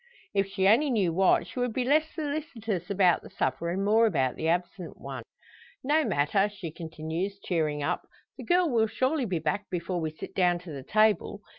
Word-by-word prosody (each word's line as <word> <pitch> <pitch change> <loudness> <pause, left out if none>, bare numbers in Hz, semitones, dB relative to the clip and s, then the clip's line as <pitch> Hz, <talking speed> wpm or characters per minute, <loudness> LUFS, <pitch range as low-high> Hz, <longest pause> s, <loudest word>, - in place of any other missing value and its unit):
If 195 -1 +1
she 195 -1 +1
only 250 +9 +5
knew 200 -9 +1
what, 190 +2 +3
she - - -7
would 245 -2 0
be 255 - 0
less 310 +4 +3
solicitous 285 - -4
about 185 -4 +3
the - - -12
supper, 130 +6 -2
and 190 +3 -1
more 225 +2 +5
about 135 - 0
the 160 - -3
absent 175 +1 -2
one. - - -6 0.6
"No 300 +4 +3
matter," 195 - +1
she 190 -6 -7
continues, 165 +4 -4
cheering 155 -6 -1
up, - - -2 0.3
"the - - -9
girl 355 0 +3
will 230 -6 +2
surely 260 +5 0
be 185 -5 -1
back 165 +6 -2
before 175 0 -2
we 160 - -1
sit 155 - -9
down 180 -2 +3
to 180 -2 -10
the 140 -2 -6
table. 210 +3 +1
195 Hz, 195 wpm, -28 LUFS, 170-230 Hz, 0.6 s, only